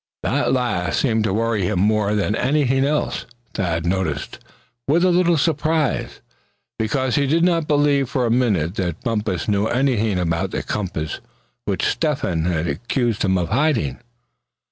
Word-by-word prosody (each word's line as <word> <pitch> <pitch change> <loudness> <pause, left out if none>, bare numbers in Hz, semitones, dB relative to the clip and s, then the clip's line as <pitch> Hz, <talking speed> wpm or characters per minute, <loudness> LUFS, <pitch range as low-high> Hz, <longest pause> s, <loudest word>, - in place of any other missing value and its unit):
That - - +1
last 120 -8 0
seemed 110 -5 +1
to 95 - 0
worry 115 -1 0
him 100 -1 -1
more 105 +1 +2
than 105 0 0
anything 135 0 +1
else, 150 +1 -1 0.3
Thad 85 -4 -1
noticed, 85 -5 -2 0.5
with 165 +6 +3
a 185 - +4
little 175 -1 +3
surprise; 155 -1 0 0.6
because 125 +3 0
he 140 -1 +2
did 165 +4 +2
not 170 -3 +2
believe 145 -3 +2
for 130 -3 0
a 115 - 0
minute 105 -10 +1
that 90 +2 -3
Bumpus 105 -7 -2
knew 105 0 +1
anything 120 -6 +1
about 85 -2 -1
the - - -3
compass 90 -7 -3 0.5
which - - -1
Step - - 0
hen 80 -1 -1
accused 95 - -1
him 95 -2 +2
of 85 -2 -1
hiding. 115 - +1
110 Hz, 155 wpm, -21 LUFS, 95-140 Hz, 0.6 s, a